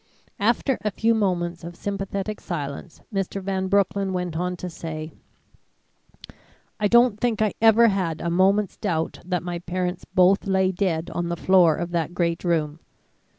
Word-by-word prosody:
After 235 +5 +1
a 210 - +1
few 225 +2 +1
moments 175 -5 -1
of 170 +1 -8
sympathetic 200 +1 -4
silence, 150 -1 -6
Mr. 195 0 -2
Van 190 0 -2
Broecklyn 195 0 +1
went 180 -2 -3
on 180 +2 -2
to 180 - -5
say: 160 -2 -6 1.7
"I 210 - +2
don't 235 -1 +4
think 235 -3 0
I 215 -2 +1
ever 225 +1 +6
had 180 -5 -1
a 170 - -2
moment's 195 +3 +2
doubt 165 -5 -2
that 180 -1 -2
my 175 -1 -4
parents 180 +1 -3
both 185 +2 +3
lay 190 -1 +2
dead 175 -3 -1
on 175 0 -2
the 170 - -2
floor 175 -3 +4
of 175 +2 -4
that 170 0 -2
great 170 -1 0
room. 160 -3 0
185 Hz, 160 wpm, -24 LUFS, 170-200 Hz, 1.7 s, ever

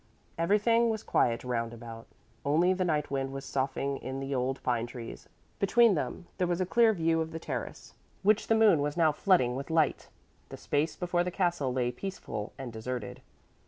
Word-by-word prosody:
Everything 210 +7 +3
was 220 -1 -2
quiet 115 -1 +1
roundabout, 115 -1 -4 0.4
only 165 +6 +3
the 185 0 -1
night 150 -5 0
wind 135 -1 -1
was 135 0 -6
soughing 135 +1 -1
in 130 0 -5
the 135 +1 -4
old 130 +1 -1
pine 120 -2 0
trees. 120 -1 -9 0.3
Between 230 +2 +5
them 150 +2 -3
there 180 - +2
was 175 0 0
a 185 - +1
clear 230 +4 +4
view 165 -4 +1
of 160 - -3
the 165 - -6
terrace, 165 - -6 0.3
which 215 +2 +3
the 225 - +4
moon 215 -9 +5
was 145 +2 -2
now 160 -2 +4
flooding 150 -6 +2
with 135 +3 -5
light; 160 -3 +1 0.4
the - - -8
space 150 +2 -1
before 175 -1 0
the 180 - -2
castle 175 -7 0
lay 125 -1 0
peaceful 125 - -6
and 130 -4 -7
deserted. 115 -1 -5
150 Hz, 185 wpm, -30 LUFS, 130-180 Hz, 0.4 s, Between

